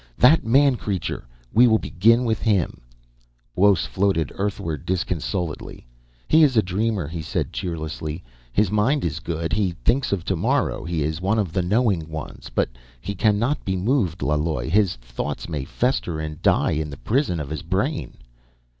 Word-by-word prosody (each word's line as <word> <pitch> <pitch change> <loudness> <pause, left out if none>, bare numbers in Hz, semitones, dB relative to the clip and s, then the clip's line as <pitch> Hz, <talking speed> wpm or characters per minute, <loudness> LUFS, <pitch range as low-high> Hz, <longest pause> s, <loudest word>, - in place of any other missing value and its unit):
That 150 +6 +6
man 135 +2 +4
creature, 100 -6 -3 0.3
we 120 +3 +7
will 110 -1 +5
begin 115 +6 +3
with 110 -2 0
him 100 -7 +1 0.4
..." - - -40
Buos 100 0 +4
floated 95 -6 0
earthward 85 -7 -3
disconsolately. 90 -3 -3 0.4
"He 160 - +5
is 135 -6 +4
a 110 - +5
dreamer," 100 -2 -1
he 80 +1 -5
said 80 - -3
cheerlessly. 80 -2 -4 0.3
"His 105 +4 +2
mind 125 +7 +2
is 80 -1 -2
good; 85 -1 -3
he 95 -4 0
thinks 130 +3 +2
of 95 -4 -1
tomorrow; 95 -4 0
he 85 -3 -1
is 80 +3 -2
one 100 +4 +1
of 95 -7 -1
the 95 - +1
knowing 95 -4 +1
ones. 80 -1 -7
But - - 0 0.3
he 100 - -4
cannot 110 +8 +1
be 95 - -1
moved, 95 - 0
Laloi. 75 -4 0
His 100 +1 +3
thoughts - - -5
may 75 -5 -3
fester 90 - -1
and 75 -1 -5
die - - +3
in 75 0 -1
the 70 - -8
prison 115 - 0
of 75 -1 -5
his 80 -3 -3
brain - - -2
90 Hz, 170 wpm, -23 LUFS, 80-110 Hz, 0.4 s, we